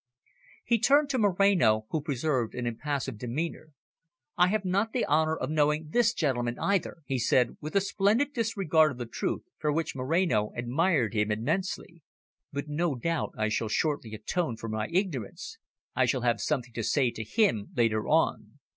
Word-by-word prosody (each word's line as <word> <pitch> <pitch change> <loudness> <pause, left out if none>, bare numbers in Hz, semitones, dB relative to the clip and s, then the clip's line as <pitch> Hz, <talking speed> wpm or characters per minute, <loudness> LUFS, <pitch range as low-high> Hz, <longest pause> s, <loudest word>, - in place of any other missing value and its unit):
He 235 -1 +2
turned 285 +4 +4
to 260 - 0
Moreno, 185 - +3
who 160 - 0
preserved 135 -4 -1
an 125 - -3
impassive 130 0 -3
demeanour. 155 +6 -4 0.7
"I 180 0 +5
have 205 +1 0
not 200 +5 0
the 250 - +1
honour 155 +1 +2
of 130 - -3
knowing 150 0 +1
this 235 +1 +3
gentleman, 120 -6 -1
either," 190 -4 -1
he 130 -1 -1
said 120 +1 +2
with 155 +5 -6
a 200 - +5
splendid 205 +8 +1
disregard 195 - +2
of - - -12
the 120 - -4
truth, 115 - -3 0.2
for 150 -1 0
which 160 0 -2
Moreno 130 - +1
admired 125 - +1
him 105 -1 +1
immensely. 170 - -2 0.5
"But 140 +1 -4
no 150 0 -1
doubt 165 +6 -2
I 110 0 0
shall 110 0 -1
shortly 130 -4 -1
atone 120 +3 -2
for 115 - -6
my 110 0 -2
ignorance. 170 - -3 0.4
I - - +3
shall 130 - 0
have 120 -1 +1
something 125 -6 -2
to 115 - -3
say 125 +2 +2
to 110 - -6
him 110 - +1
later 110 -3 +1
on." - - +1
150 Hz, 175 wpm, -28 LUFS, 120-180 Hz, 0.7 s, I